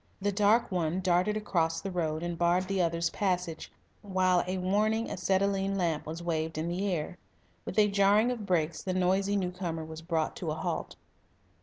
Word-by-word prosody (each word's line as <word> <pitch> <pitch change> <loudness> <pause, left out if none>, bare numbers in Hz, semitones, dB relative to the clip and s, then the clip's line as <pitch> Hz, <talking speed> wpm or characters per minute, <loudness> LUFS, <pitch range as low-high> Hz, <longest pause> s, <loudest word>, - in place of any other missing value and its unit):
The 205 +1 0
dark 210 +3 +3
one 175 -1 0
darted 185 +3 +2
across 165 -6 0
the 195 - -5
road 160 -2 -1
and 175 0 -2
barred 175 +2 +2
the 195 -1 0
other's 170 0 0
passage, 180 -5 -2 0.3
while 185 -2 +2
a 185 +1 -1
warning 210 +5 +1
acetylene 195 +1 0
lamp 165 -5 -1
was 165 +2 -5
waved 160 -2 -2
in 160 +2 -2
the 190 +3 -1
air. 175 +2 -3 0.5
With - - -6
a 210 -1 +6
jarring 205 +4 +4
of 225 -5 -5
brakes 165 -3 0
the 185 -1 -3
noisy 190 +2 +2
new 180 -2 -1
comer 170 -3 -4
was 160 0 -8
brought 165 -2 -1
to 170 - -4
a 155 - -1
halt. 160 - -3
180 Hz, 185 wpm, -30 LUFS, 165-195 Hz, 0.5 s, a